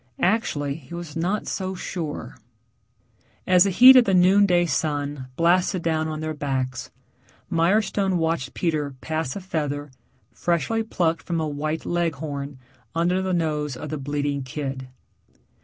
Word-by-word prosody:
Actually 155 Hz, -9 st, +1 dB
he 155 Hz, +2 st, -10 dB
was 170 Hz, -4 st, -7 dB
not 180 Hz, +6 st, -1 dB
so 190 Hz, -1 st, -3 dB
sure.... 155 Hz, -, -5 dB, 1.1 s
As 180 Hz, 0 st, +5 dB
the -, -, +2 dB
heat 255 Hz, +7 st, +9 dB
of 250 Hz, -2 st, +7 dB
the 195 Hz, -, +2 dB
noon 190 Hz, +3 st, +5 dB
day 175 Hz, -1 st, +3 dB
sun 145 Hz, -4 st, -2 dB
blasted 175 Hz, +2 st, +2 dB
down 160 Hz, -1 st, 0 dB
on 155 Hz, 0 st, -4 dB
their 155 Hz, 0 st, -3 dB
backs, 130 Hz, -4 st, -3 dB, 0.6 s
Mirestone 190 Hz, +2 st, +2 dB
watched 160 Hz, -5 st, -1 dB
Peter 150 Hz, -5 st, -1 dB
pass 160 Hz, -4 st, -3 dB
a -, -, -4 dB
feather, 145 Hz, -5 st, -3 dB, 0.4 s
freshly 175 Hz, +6 st, 0 dB
plucked 170 Hz, -7 st, 0 dB
from 170 Hz, -1 st, -2 dB
a 160 Hz, -, -1 dB
white 155 Hz, +2 st, -3 dB
Leghorn, 145 Hz, -5 st, -2 dB, 0.4 s
under 175 Hz, +3 st, +1 dB
the 190 Hz, 0 st, -2 dB
nose 150 Hz, -5 st, -1 dB
of 150 Hz, -, -7 dB
the 155 Hz, -, -3 dB
bleating 145 Hz, 0 st, -2 dB
kid. 135 Hz, 0 st, -5 dB
160 Hz, 145 wpm, -24 LUFS, 145-180 Hz, 1.1 s, heat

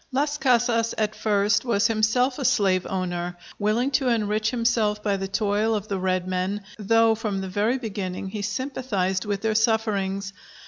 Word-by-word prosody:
Las 290 Hz, +3 st, 0 dB
Casas 240 Hz, -3 st, +2 dB
at 215 Hz, -1 st, 0 dB
first 205 Hz, -1 st, +2 dB
was 230 Hz, -5 st, +1 dB
himself 230 Hz, +4 st, +2 dB
a -, -, -2 dB
slave 190 Hz, -6 st, +2 dB
owner, 175 Hz, -2 st, -3 dB, 0.2 s
willing 220 Hz, +6 st, +1 dB
to 265 Hz, -1 st, +1 dB
enrich 215 Hz, -2 st, +1 dB
himself 225 Hz, -3 st, 0 dB
by 205 Hz, -2 st, +1 dB
the 195 Hz, 0 st, -3 dB
toil 210 Hz, +2 st, +1 dB
of 210 Hz, 0 st, -4 dB
the 195 Hz, -2 st, -1 dB
red 185 Hz, -1 st, 0 dB
men, 185 Hz, +2 st, -2 dB, 0.2 s
though 225 Hz, +2 st, +4 dB
from 215 Hz, -3 st, -3 dB
the 190 Hz, -, -4 dB
very 210 Hz, +7 st, 0 dB
beginning 195 Hz, -5 st, -4 dB
he 210 Hz, +1 st, -5 dB
sympathized 205 Hz, -5 st, -2 dB
with 205 Hz, -1 st, -2 dB
their 220 Hz, 0 st, 0 dB
sufferings. 205 Hz, -3 st, 0 dB
210 Hz, 170 wpm, -24 LUFS, 195-230 Hz, 0.2 s, though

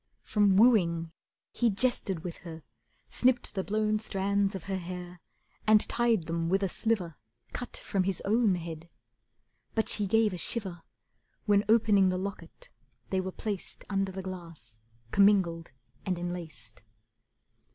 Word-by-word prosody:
From 205 Hz, -3 st, +3 dB
wooing 170 Hz, -8 st, +4 dB, 0.4 s
he 240 Hz, -, +1 dB
jested 200 Hz, -5 st, 0 dB
with 175 Hz, -2 st, -6 dB
her, 160 Hz, -3 st, -10 dB, 0.4 s
snipped 250 Hz, -1 st, +1 dB
the 190 Hz, -, -2 dB
blown 215 Hz, +1 st, 0 dB
Strands 200 Hz, -1 st, 0 dB
of 190 Hz, -, -6 dB
her 195 Hz, -1 st, -3 dB
hair, 180 Hz, -1 st, -7 dB, 0.5 s
and 215 Hz, 0 st, +7 dB
tied 235 Hz, -6 st, +2 dB
them 165 Hz, 0 st, -2 dB
with 195 Hz, +2 st, +1 dB
a 195 Hz, -, +1 dB
sliver 185 Hz, -7 st, -1 dB, 0.4 s
Cut 245 Hz, -, -4 dB
from 190 Hz, -2 st, -1 dB
his 190 Hz, -2 st, -1 dB
own 215 Hz, -1 st, +3 dB
head. 165 Hz, -1 st, -7 dB, 0.9 s
But 220 Hz, -, +1 dB
she 205 Hz, -2 st, +1 dB
gave 220 Hz, 0 st, +3 dB
a 180 Hz, -, -5 dB
shiver 190 Hz, -4 st, -2 dB, 0.6 s
When, 205 Hz, -1 st, +4 dB
opening 210 Hz, -4 st, +5 dB
the 185 Hz, -, -1 dB
locket, 200 Hz, -, -7 dB, 0.4 s
they 190 Hz, -1 st, +1 dB
were 190 Hz, 0 st, -4 dB
placed 205 Hz, -1 st, -5 dB
Under 195 Hz, -1 st, 0 dB
the 190 Hz, 0 st, -6 dB
glass, 165 Hz, -12 st, -10 dB, 0.3 s
commingled 190 Hz, -6 st, +3 dB, 0.3 s
and 185 Hz, -2 st, -1 dB
enlaced. 160 Hz, -, -7 dB
190 Hz, 140 wpm, -29 LUFS, 175-210 Hz, 0.9 s, and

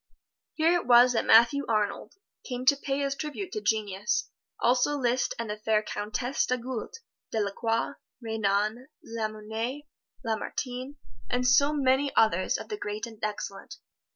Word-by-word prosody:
Here 325 Hz, +2 st, +3 dB
it 350 Hz, -, 0 dB
was 245 Hz, +1 st, +7 dB
that 225 Hz, -, 0 dB
Matthew 235 Hz, +6 st, +6 dB
Arnold 210 Hz, -, -1 dB, 0.3 s
came 250 Hz, -1 st, -5 dB
to 280 Hz, -, +6 dB
pay 275 Hz, 0 st, -2 dB
his 275 Hz, -1 st, 0 dB
tribute 305 Hz, +6 st, -5 dB
to 425 Hz, -, -4 dB
genius, 210 Hz, -, -1 dB, 0.3 s
also 255 Hz, +4 st, +2 dB
Liszt 250 Hz, -1 st, 0 dB
and 230 Hz, -, -3 dB
the 210 Hz, 0 st, -4 dB
fair 215 Hz, 0 st, +1 dB
Countess 215 Hz, +6 st, -2 dB
d'Agoult, 250 Hz, -, -3 dB, 0.4 s
Delacroix, 225 Hz, +4 st, -1 dB, 0.3 s
Renan, 220 Hz, +1 st, -1 dB, 0.2 s
Lamennais, 225 Hz, +4 st, -4 dB, 0.4 s
Lamartine, 250 Hz, +4 st, -3 dB, 0.3 s
and 250 Hz, 0 st, 0 dB
so 280 Hz, +4 st, +5 dB
many 275 Hz, 0 st, +2 dB
others 185 Hz, -5 st, +3 dB
of -, -, -9 dB
the 420 Hz, -, -3 dB
great 210 Hz, -, -4 dB
and 225 Hz, -2 st, -12 dB
excellent. 205 Hz, -2 st, -5 dB
240 Hz, 140 wpm, -28 LUFS, 215-270 Hz, 0.4 s, was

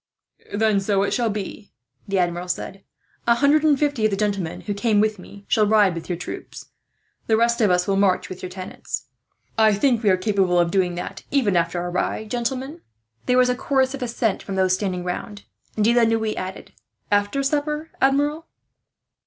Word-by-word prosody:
"Then 210 Hz, -1 st, +2 dB
so 195 Hz, 0 st, +1 dB
it 200 Hz, -, -1 dB
shall 235 Hz, -2 st, +1 dB
be," 205 Hz, 0 st, -5 dB, 0.4 s
the 195 Hz, -1 st, 0 dB
Admiral 175 Hz, 0 st, 0 dB
said. 190 Hz, +2 st, -4 dB, 0.4 s
"A 235 Hz, -, +5 dB
hundred 285 Hz, +4 st, +3 dB
and 300 Hz, -3 st, +4 dB
fifty 290 Hz, -5 st, 0 dB
of 215 Hz, -, +4 dB
the 195 Hz, -, -2 dB
gentlemen 200 Hz, -5 st, -2 dB
who 205 Hz, -, -3 dB
came 210 Hz, +1 st, +1 dB
with 215 Hz, -1 st, +1 dB
me 200 Hz, +2 st, -13 dB
shall 215 Hz, -1 st, +3 dB
ride 205 Hz, -3 st, +4 dB
with 165 Hz, +1 st, -7 dB
your 175 Hz, -, -1 dB
troop. 175 Hz, -, -7 dB, 0.7 s
The 220 Hz, -, +3 dB
rest 235 Hz, +1 st, +2 dB
of 210 Hz, -, +4 dB
us 180 Hz, 0 st, +2 dB
will 195 Hz, -1 st, +1 dB
march 195 Hz, -2 st, +2 dB
with 185 Hz, -, -9 dB
your 185 Hz, -, -5 dB
tenants. 185 Hz, 0 st, -6 dB, 0.5 s
"I 220 Hz, -1 st, +5 dB
think 235 Hz, +2 st, +2 dB
we 215 Hz, -, +3 dB
are 185 Hz, -, +4 dB
capable 185 Hz, -2 st, +1 dB
of 170 Hz, -1 st, +2 dB
doing 180 Hz, -2 st, +1 dB
that, 195 Hz, +2 st, -6 dB
even 240 Hz, -9 st, +2 dB
after 170 Hz, +1 st, +1 dB
our 175 Hz, 0 st, -3 dB
ride, 210 Hz, +4 st, -2 dB
gentlemen?" 260 Hz, +6 st, -3 dB, 0.5 s
There 250 Hz, -, +3 dB
was 250 Hz, 0 st, +5 dB
a -, -, +3 dB
chorus 265 Hz, +1 st, +1 dB
of 275 Hz, -, -6 dB
assent 230 Hz, -4 st, -1 dB
from 195 Hz, -, -6 dB
those 185 Hz, -1 st, +2 dB
standing 185 Hz, -2 st, -2 dB
round, 205 Hz, +3 st, -5 dB, 0.3 s
and 210 Hz, -, +1 dB
De 235 Hz, -, +4 dB
la 240 Hz, -, +4 dB
Noue 225 Hz, -1 st, +1 dB
added: 185 Hz, 0 st, -6 dB, 0.4 s
"After 205 Hz, +7 st, +1 dB
supper, 300 Hz, +2 st, -1 dB
Admiral?" 290 Hz, +4 st, +1 dB
210 Hz, 200 wpm, -22 LUFS, 185-245 Hz, 0.7 s, A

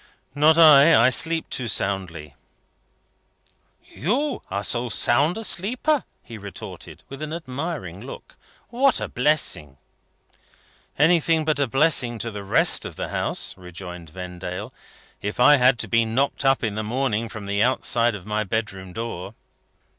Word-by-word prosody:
"Not 150 Hz, +3 st, +4 dB
I. 155 Hz, -2 st, +7 dB
I 125 Hz, +3 st, +5 dB
sleep 165 Hz, +4 st, +1 dB
too 125 Hz, -, -2 dB
soundly." 90 Hz, -8 st, -3 dB, 1.5 s
"You 245 Hz, -, -2 dB
are 100 Hz, +2 st, -3 dB
so 120 Hz, +4 st, -1 dB
sound 140 Hz, -, +2 dB
a 225 Hz, -, -5 dB
sleeper?" 250 Hz, -, 0 dB, 0.2 s
he 115 Hz, -2 st, -10 dB
retorted, 100 Hz, -1 st, -10 dB
with 135 Hz, +1 st, -10 dB
an 155 Hz, 0 st, -5 dB
admiring 140 Hz, -, -5 dB
look. 130 Hz, -, -11 dB, 0.3 s
"What 255 Hz, +1 st, +2 dB
a -, -, -3 dB
blessing!" 125 Hz, -, 0 dB, 1.2 s
"Anything 160 Hz, 0 st, +3 dB
but 155 Hz, -2 st, 0 dB
a 140 Hz, -, +1 dB
blessing 135 Hz, -3 st, +2 dB
to 115 Hz, +1 st, -4 dB
the 105 Hz, -1 st, -7 dB
rest 100 Hz, -, +2 dB
of -, -, -8 dB
the -, -, -5 dB
house," -, -, -2 dB
rejoined 90 Hz, -2 st, -10 dB
Vendale, 90 Hz, +1 st, -7 dB, 0.5 s
"if 105 Hz, +3 st, -5 dB
I 145 Hz, +4 st, +7 dB
had 125 Hz, 0 st, +4 dB
to -, -, -5 dB
be 115 Hz, 0 st, +2 dB
knocked 130 Hz, +7 st, -1 dB
up 135 Hz, -1 st, +2 dB
in 110 Hz, -3 st, -1 dB
the 110 Hz, -, -3 dB
morning 115 Hz, 0 st, -2 dB
from 105 Hz, -1 st, -8 dB
the 100 Hz, +1 st, -1 dB
outside 120 Hz, -1 st, +2 dB
of 95 Hz, -3 st, -10 dB
my 105 Hz, 0 st, -1 dB
bedroom 95 Hz, -3 st, -4 dB
door." 115 Hz, -5 st, -6 dB
120 Hz, 150 wpm, -23 LUFS, 100-150 Hz, 1.5 s, I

